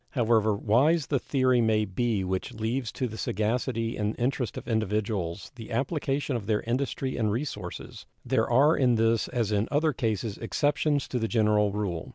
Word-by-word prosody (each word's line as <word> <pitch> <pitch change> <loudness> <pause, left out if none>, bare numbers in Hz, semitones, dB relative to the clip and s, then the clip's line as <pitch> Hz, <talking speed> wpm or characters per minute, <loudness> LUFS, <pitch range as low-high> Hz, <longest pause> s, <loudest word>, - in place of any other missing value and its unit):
However 110 -4 +2
wise 135 +10 +3
the 140 - 0
theory 130 -2 +2
may 110 -1 +2
be 105 +1 -1
which 95 +6 -3
leaves 115 +2 -2
to 130 - -2
the 110 -1 -8
sagacity 115 +2 -1
and 105 0 -1
interest 125 -2 -1
of - - -7
individuals 105 -5 -2
the 115 -4 -10
application 140 +2 -1
of 110 -4 -4
their 105 -1 +1
industry 130 +2 -2
and 110 -3 +1
resources, 105 -7 -5 0.2
there - - +1
are 140 +6 +5
in 125 -3 +3
this 115 0 +2
as 115 -4 -1
in 105 +1 +1
other 150 +1 +2
cases 110 -3 -2
exceptions 145 +4 0
to 125 - -2
the 115 - 0
general 105 -2 +2
rule. 100 -5 -3
115 Hz, 175 wpm, -27 LUFS, 105-130 Hz, 0.2 s, are